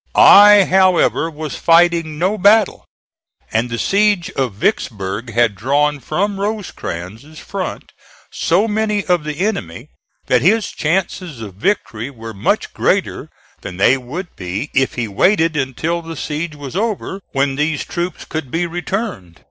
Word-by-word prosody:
I, 205 0 +8
however, 185 -3 +3
was 155 -2 -6
fighting 165 -2 +3
no 185 +6 +1
battle, 210 +1 +3 0.7
and 115 +2 0
the 115 - -3
siege 200 - +1
of 130 -7 -2
Vicksburg 100 +1 -2
had 115 -1 +2
drawn 145 +7 0
from 195 - -2
Rosecrans' 155 - -5
front - - -6 0.4
so 185 +7 +1
many 210 -1 -1
of 175 -4 +1
the 150 0 -4
enemy 195 - -4 0.4
that 125 -2 +2
his 210 +6 +2
chances 170 -3 -2
of 105 -4 -8
victory 115 - -2
were 115 -4 -9
much 100 - -1
greater - - -1 0.3
than 95 -3 -8
they 100 +7 +4
would 145 +8 -7
be 95 +10 -5
if 135 -1 +1
he 120 -2 -2
waited 165 - +2
until 150 +5 -2
the 165 0 -8
siege 155 +2 -4
was 145 0 -8
over, 200 -2 -2
when 135 -1 +1
these 150 +1 -1
troops 175 +1 -4
could 155 -5 -5
be 165 +6 -1
returned. 175 - -4
155 Hz, 145 wpm, -18 LUFS, 125-190 Hz, 0.7 s, I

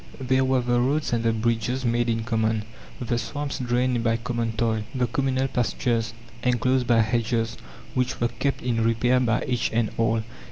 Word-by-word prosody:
There 130 0 +2
were 130 -1 +2
the 120 0 +1
roads 140 +2 0
and 115 -1 +1
the 115 - +3
bridges 115 +3 -1
made 120 0 +1
in 115 -1 0
common, 110 -1 0 0.4
the 120 -1 -1
swamps 145 +5 -4
drained 125 -1 +1
by 115 0 +2
common 115 -1 -2
toil, 110 0 0
the 125 -1 +2
communal 130 +2 0
pastures 115 -2 -1 0.3
enclosed 125 +1 +1
by 115 -2 +5
hedges 115 +1 0 0.4
which 125 -1 -1
were 120 - +1
kept 135 +4 -2
in 115 -2 +1
repair 120 +3 +3
by 120 -1 +1
each 125 -3 0
and 115 -1 +1
all. 115 -1 +2
120 Hz, 175 wpm, -25 LUFS, 115-125 Hz, 0.4 s, by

